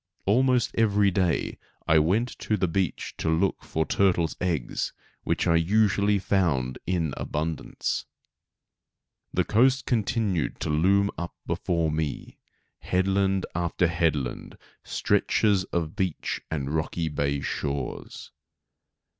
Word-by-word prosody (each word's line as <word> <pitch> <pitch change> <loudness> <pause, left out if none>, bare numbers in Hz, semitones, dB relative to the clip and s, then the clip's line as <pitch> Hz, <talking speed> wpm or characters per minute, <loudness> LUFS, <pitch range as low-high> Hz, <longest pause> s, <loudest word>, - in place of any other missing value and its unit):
Almost 125 +3 +3
every 105 -3 +3
day 90 -2 0 0.3
I 80 0 +6
went 100 +11 +2
to 105 - 0
the 90 - +1
beach 90 +1 -2
to 80 - 0
look 85 +4 +1
for 80 0 -1
turtles' 85 -5 +2
eggs, 85 -9 -1 0.3
which - - 0
I 85 - +4
usually 100 +3 +3
found 80 -11 0
in 85 -5 0
abundance. 80 +1 -3 1.2
The - - +1
coast 130 +4 +3
continued 105 - 0
to - - -1
loom 100 +6 +3
up 85 0 -5
before 85 -3 0
me, 75 -1 -4 0.4
head 95 +1 0
land 95 -1 +1
after 85 +1 0
head 85 -2 +2
land, 65 -4 -5 0.3
stretches 100 -4 +1
of 85 -4 -3
beach 95 -4 -2
and 70 -2 -3
rocky 80 +1 -1
bay 70 -2 -1
shores. 70 -2 -4
90 Hz, 120 wpm, -26 LUFS, 80-100 Hz, 1.2 s, I